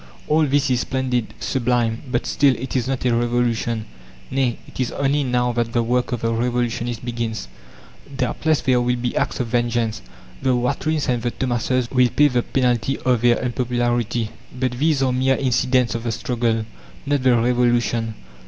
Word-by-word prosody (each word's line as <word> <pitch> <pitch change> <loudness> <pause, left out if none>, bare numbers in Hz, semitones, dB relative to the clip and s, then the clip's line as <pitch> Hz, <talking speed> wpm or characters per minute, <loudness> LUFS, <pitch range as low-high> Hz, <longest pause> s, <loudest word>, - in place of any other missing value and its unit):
All 155 0 +3
this 140 0 +2
is 125 - +2
splendid, 125 -3 -1
sublime; 115 +1 0
but 120 - -1
still, 140 -2 +3
it 130 +3 -6
is 130 -1 0
not 130 -1 -2
a 125 - +3
revolution. 120 -2 0 0.5
Nay, 130 -3 +1
it - - -13
is 125 -2 0
only 140 +1 +1
now 125 -1 +1
that 120 -1 -1
the 120 - +2
work 125 +2 0
of 120 - -2
the 115 0 0
revolutionist 120 0 -1
begins. 115 - -3 0.7
Doubtless 150 +4 0
there 125 -2 +2
will 125 0 +1
be 120 0 -3
acts - - -1
of 125 - 0
vengeance. 120 -2 0 0.4
The 130 -1 +2
Watrins 145 +5 0
and 125 -2 0
the 120 - 0
Thomases 125 0 -1
will 125 -1 +4
pay 145 +3 +4
the 125 -2 +1
penalty 125 0 0
of 125 -3 +1
their 120 -1 +4
unpopularity; 120 -2 -1 0.3
but 130 -1 +1
these 140 +2 +1
are 130 -1 +1
mere 130 +1 +2
incidents 125 -2 +1
of 115 - -3
the 115 - 0
struggle 115 -1 -1 0.4
not 145 -1 +1
the 130 -2 +4
revolution. 120 -2 +1
125 Hz, 175 wpm, -21 LUFS, 120-130 Hz, 0.7 s, will